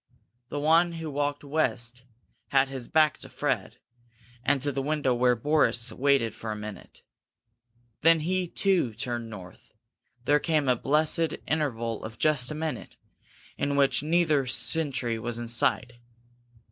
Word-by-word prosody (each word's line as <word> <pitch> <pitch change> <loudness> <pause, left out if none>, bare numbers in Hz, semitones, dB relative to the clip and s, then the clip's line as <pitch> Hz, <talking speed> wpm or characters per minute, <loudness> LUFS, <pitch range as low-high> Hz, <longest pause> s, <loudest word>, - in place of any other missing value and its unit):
The 145 - -3
one 165 +3 +3
who 165 -2 -6
walked 145 +1 -2
west 130 -5 -2 0.4
had 135 0 +2
his 130 -3 -7
back 155 -2 +3
to - - -10
Fred - - -2 0.7
and 140 +3 +2
to 145 - 0
the 135 0 -2
window 145 -2 0
where 125 0 +3
Boris 125 -2 +2
waited 135 -5 +1
for 110 - -6
a - - -3
minute. 105 0 -10 1.0
Then 165 0 +5
he, 185 +3 -1
too, 170 - +1
turned 120 -1 -4
north. 95 -4 -12 0.5
Then 145 +1 +4
came 155 -4 0
a 125 - +4
blessed 155 +5 +2
interval 115 -8 -2
of 110 0 -8
just 145 -4 +3
a 150 - -4
minute, 155 0 -5 0.6
in 140 0 0
which 140 -1 +3
neither 155 -3 +2
sentry 130 -4 +1
was 120 +1 -4
in 120 0 -5
sight. 120 +1 0
140 Hz, 145 wpm, -27 LUFS, 120-155 Hz, 1.0 s, Then